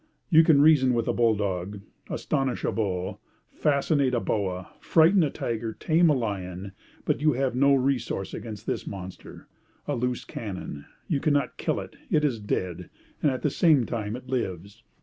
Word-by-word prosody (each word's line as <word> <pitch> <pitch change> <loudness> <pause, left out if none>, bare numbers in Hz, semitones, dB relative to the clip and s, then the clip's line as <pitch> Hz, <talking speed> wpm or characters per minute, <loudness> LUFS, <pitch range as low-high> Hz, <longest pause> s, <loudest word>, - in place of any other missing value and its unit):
You 160 0 +8
can 150 -3 +5
reason 135 -5 +5
with 115 -1 0
a - - +1
bull 115 -2 +3
dog, 100 0 -3 0.3
astonish 135 -2 -1
a - - +1
bull, 95 -4 -2 0.3
fascinate 140 -2 +1
a - - +2
boa, 95 -5 -2
frighten 170 +4 +4
a 155 - +2
tiger, 115 -3 -3
tame 165 +6 +3
a 150 - +4
lion; 95 -5 -4 0.3
but - - 0
you 155 -1 +4
have 130 0 0
no 140 +2 +5
resource 125 -7 -1
against 110 -2 -7
this - - -3
monster, 95 -2 -9 0.4
a - - 0
loose 125 0 -2
cannon. 90 -9 -6 0.2
You 150 -5 0
cannot 145 0 0
kill - - -1
it, - - -9
it 150 -1 +3
is 125 -6 0
dead; 90 -4 -3 0.3
and 150 - +4
at 130 -2 -3
the 150 - +1
same 150 -7 +4
time 110 -2 -3
it 125 +1 -10
lives. 100 -4 -4
120 Hz, 175 wpm, -26 LUFS, 100-140 Hz, 0.4 s, You